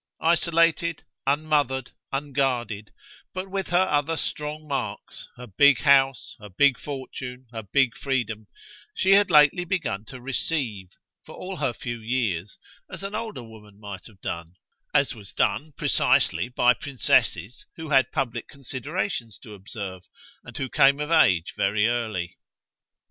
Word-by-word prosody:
Isolated, 165 0 +2 0.2
unmothered, 140 -3 +1 0.2
unguarded, 130 -7 -1 0.4
but 185 +1 -5
with 195 -1 -2
her 180 +2 +3
other 150 +2 +1
strong 150 0 -4
marks, 135 -3 -5
her 125 - -8
big 140 +6 +4
house, 135 -2 +3
her 105 -1 -11
big 130 +6 +3
fortune, 130 -2 -7
her 115 -2 -5
big 125 +5 +1
freedom, 115 -7 -2 0.5
she 190 - +2
had 200 0 +6
lately 150 +2 +6
begun 165 - -2
to 130 +3 -10
"receive," 125 - -2 0.4
for - - -12
all 185 0 -6
her 135 -5 0
few 120 -1 -6
years, 110 -6 -2 0.3
as - - -7
an 195 +1 -5
older 215 - -4
woman 105 -3 -15
might 100 -3 -8
have 100 -3 -19
done 85 +1 -5 0.4
as 140 - +2
was 105 -5 -12
done, 155 +1 0
precisely, 120 - +2
by 125 0 +4
princesses 125 - 0
who 160 -2 -7
had 135 -6 +4
public 120 -4 -2
considerations 140 - -4
to 110 - -12
observe 95 -2 -8 0.4
and - - -10
who 135 - -2
came 140 +2 +4
of 150 +2 -3
age 95 - +4
very 105 +2 +2
early. 110 -7 -2
130 Hz, 145 wpm, -25 LUFS, 110-150 Hz, 0.5 s, had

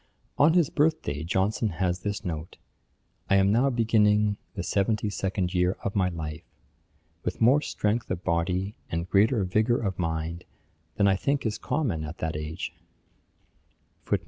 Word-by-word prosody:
On 155 +3 +6
his 170 -5 +3
birth 155 +2 +2
day, 75 +1 -3
Johnson 95 +6 0
has 90 +1 -1
this 100 +2 -4
note: 80 -1 -5 0.7
'I 100 - +5
am 100 0 +4
now 125 +6 +3
beginning 105 -3 +3 0.2
the 95 - -3
seventy 105 +2 0
second 95 -2 -2
year 90 +1 +1
of 100 - -3
my 95 -2 +2
life, 80 -2 -5 0.8
with 90 - -3
more 130 +6 +5
strength 110 -4 -1
of 85 - -3
body, 90 +4 0 0.2
and 85 +1 -2
greater 105 +3 +3
vigour 110 +6 +2
of 95 -5 -3
mind, 80 0 -2 0.5
than 100 - +3
I 95 - +4
think 140 +7 -1
is 110 -1 -1
common 115 - -1
at 75 +2 -6
that 80 -1 -3
age.' 75 +3 -5
95 Hz, 155 wpm, -27 LUFS, 85-110 Hz, 0.8 s, On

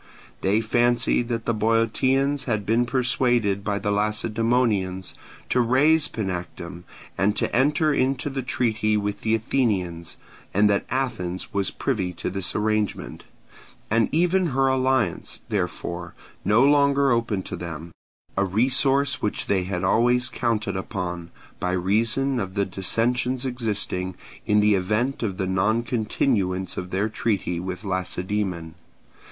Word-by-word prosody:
They 100 +3 +2
fancied 120 +1 +2
that 115 -1 -3
the 115 - +1
Boeotians 115 +6 +1
had 110 -5 -1
been 115 +3 +2
persuaded 120 -5 +1
by 100 -1 -1
the 105 0 -1
Lacedaemonians 105 -2 0 0.4
to 125 - +3
raze 145 +6 +4
Panactum 90 -3 -5 0.3
and 100 +3 +2
to - - -1
enter 150 +4 +3
into 135 0 0
the 135 0 -2
treaty 110 -4 0
with 105 0 -2
the 110 0 +2
Athenians, 100 -8 -1 0.4
and 105 +1 +5
that 100 - 0
Athens 110 -9 -3
was 100 -1 0
privy 95 -9 -2
to 85 - -4
this 95 -2 -3
arrangement, 110 -1 -1 0.7
and 115 0 +3
even 180 +3 +2
her 135 -2 +1
alliance, 130 -7 +1
therefore, 85 -3 -3 0.3
no 110 +6 +4
longer 140 -1 +4
open 115 -5 0
to - - -6
them—a 85 +3 -6
resource 135 +7 +2
which 105 - -2
they 95 -2 +1
had 90 -1 -3
always 120 +5 +3
counted 115 -4 -1
upon, 90 -2 -4 0.3
by 90 - -1
reason 115 +8 +1
of 95 -3 -4
the 100 -1 +1
dissensions 120 +7 0
existing, 105 -7 -2 0.3
in 105 0 +4
the 105 0 +4
event 105 +8 0
of 100 -5 -2
the 95 - -1
noncontinuance 105 -1 0
of 90 - -5
their 95 +3 0
treaty 100 -5 -1
with 90 +2 -5
Lacedaemon. 95 -2 -2
110 Hz, 135 wpm, -24 LUFS, 95-125 Hz, 0.7 s, and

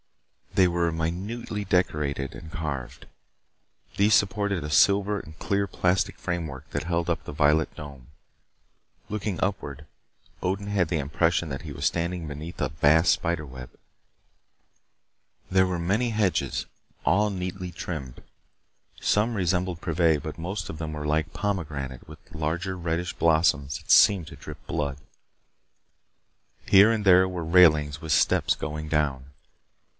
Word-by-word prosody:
They 95 - +5
were 85 -1 0
minutely 95 +7 -3
decorated 75 -7 0
and 80 - -10
carved. 75 -7 -5 0.9
These 105 +2 +5
supported 100 -4 +1
a 75 - -5
silver 100 +6 +3
and 80 -3 -12
clear 100 -1 0
plastic 90 -1 0
framework 80 -5 -5
that 75 - -2
held 85 0 -1
up 85 - -1
the - - -7
violet 75 +1 +2
dome. 70 -4 -10 1.0
Looking 105 -4 -3
upward, 75 -7 -3 0.6
Odin 95 +2 -2
had 95 -5 +1
the 80 - 0
impression 80 +3 0
that 70 -1 -5
he 80 - -8
was 70 +1 -4
standing 85 0 -1
beneath 75 +4 -7
a - - 0
vast 80 +2 +4
spider 85 -2 -2
web. 65 -2 -10 1.8
There 95 0 +3
were 90 -2 -2
many 105 +8 +1
hedges, 105 -4 0 0.4
all 105 +9 +3
neatly 90 -1 -5
trimmed. 75 -7 -6 0.8
Some 110 +3 +1
resembled 90 -2 -1
privet, 80 -3 +1
but 80 +1 -6
most 90 +3 -4
of 80 - -7
them 80 -1 -4
were 75 -1 -5
like 75 +1 0
pomegranate 75 -10 -4
with 80 -1 -11
larger 85 +4 -2
reddish 85 0 -2
blossoms 80 -4 +2
that - - -5
seemed 95 -6 +6
to - - -10
drip - - -11
blood. 75 -4 -2 1.7
Here 100 +3 +7
and 110 -2 -1
there 95 0 +6
were 90 -3 -4
railings 75 -3 +4
with 80 -2 -4
steps - - +3
going 75 0 -5
down. 75 -4 0
85 Hz, 140 wpm, -26 LUFS, 75-95 Hz, 1.8 s, Here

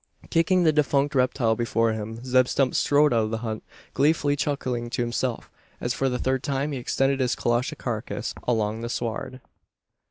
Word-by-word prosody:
Kicking 175 +2 +3
the 160 -2 +4
defunct 145 -1 +2
reptile 125 -3 +2
before 115 -1 +1
him, 110 +3 -6
Zeb 130 0 +4
Stump 130 -1 +1
strode 145 -1 +3
out 115 -2 +2
of - - -3
the 115 - -2
hut, 110 -1 -3 0.3
gleefully 145 0 +2
chuckling 130 -5 -2
to 120 - -1
himself, 120 0 -2 0.3
as, 120 - -1
for 135 - 0
the 125 - -1
third 130 +1 0
time, 140 +2 -1
he 135 - -3
extended 135 +2 +1
his 125 -2 +1
colossal 120 +1 0
carcase - - -4
along 110 -2 0
the 120 - -4
sward. 120 +2 -4
130 Hz, 180 wpm, -25 LUFS, 120-140 Hz, 0.3 s, the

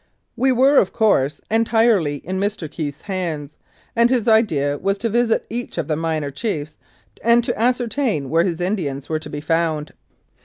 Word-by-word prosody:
We 260 +2 +2
were, 265 +3 +4
of 190 - +1
course, 150 - +2
entirely 225 -8 +3
in 185 +2 -3
Mr. 200 -4 -2
Keith's 145 -2 -5
hands, 165 -7 -4 0.4
and 235 0 +4
his 245 -3 +1
idea 150 -11 +2
was 195 +1 0
to 230 +3 -2
visit 235 +1 +1
each 240 -2 -5
of 165 -4 -2
the 155 - 0
minor 155 -2 -2
chiefs 155 - -4 0.5
and 235 +1 +4
to - - -1
ascer 245 +2 +1
tain 220 - -1
where 165 +1 +4
his 175 -2 -2
Indians 170 -8 -2
were 155 -1 0
to 155 - -9
be 145 0 -5
found. 155 -1 -1
185 Hz, 180 wpm, -21 LUFS, 150-230 Hz, 0.5 s, were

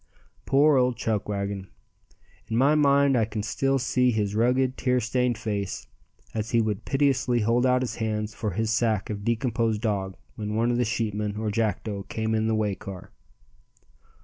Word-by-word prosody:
Poor 145 +1 +5
old 125 -2 +2
Chuckwagon! 100 -3 -2 0.8
In 115 - -1
my 135 +4 +4
mind 140 -2 +4
I 115 - +3
can 105 -1 -4
still 135 +5 0
see 125 0 +2
his 105 -4 0
rugged, 125 +4 +2
tear 125 -1 +1
stained 125 +1 0
face 100 -3 -3 0.5
as 110 0 -3
he 115 - +2
would 110 -3 -1
piteously 130 -4 +1
hold 120 +4 +2
out 125 0 +3
his 125 - -4
hands 110 -1 -2
for 105 0 -3
his 110 +3 -1
sack 110 -3 0
of 100 -1 -5
decomposed 115 -1 0
dog 95 -4 -1 0.2
when 105 0 -4
one 115 +2 +2
of 120 - 0
the 125 - +2
sheepmen 105 -2 -2
or 110 -1 -2
Jackdo 105 -2 -2
came 110 0 -2
in 110 0 +1
the 110 - +1
way 105 -2 0
car. 95 -1 -9
110 Hz, 175 wpm, -26 LUFS, 105-125 Hz, 0.8 s, Poor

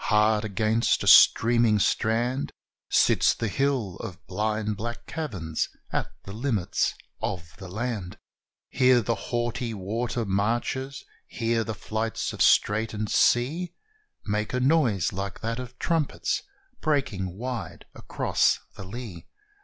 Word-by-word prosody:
Hard 105 0 +3
against 110 +2 +1
a - - -3
streaming 115 -2 +6
strand, 120 +6 +1 0.4
Sits - - +4
the 115 - -2
hill 125 -5 0
of 90 - -8
blind 105 +2 -1
black 120 +3 -6
caverns, 95 - -3 0.2
at - - -1
the 100 - -8
limits 110 -5 0 0.3
of 80 -3 -4
the 95 - -9
land. 105 -2 -4 0.5
Here 130 -2 +4
the 115 +2 0 0.2
haughty 120 -1 -2
water 115 +4 -2
marches 120 +7 -1 0.2
here 115 -1 0
the 110 -1 -4
flights 110 +3 -3
of - - -5
straitened 105 0 +3
sea 160 +9 +2 0.5
Make 105 +2 -1
a - - +1
noise 125 - +2
like 100 0 -5
that 115 +1 -2
of 125 0 -8
trumpets, 165 -1 0 0.4
breaking 115 - -1
wide 125 +1 -5
across - - +1 0.2
the - - -8
lea! 100 -3 -8
115 Hz, 125 wpm, -26 LUFS, 100-125 Hz, 0.5 s, streaming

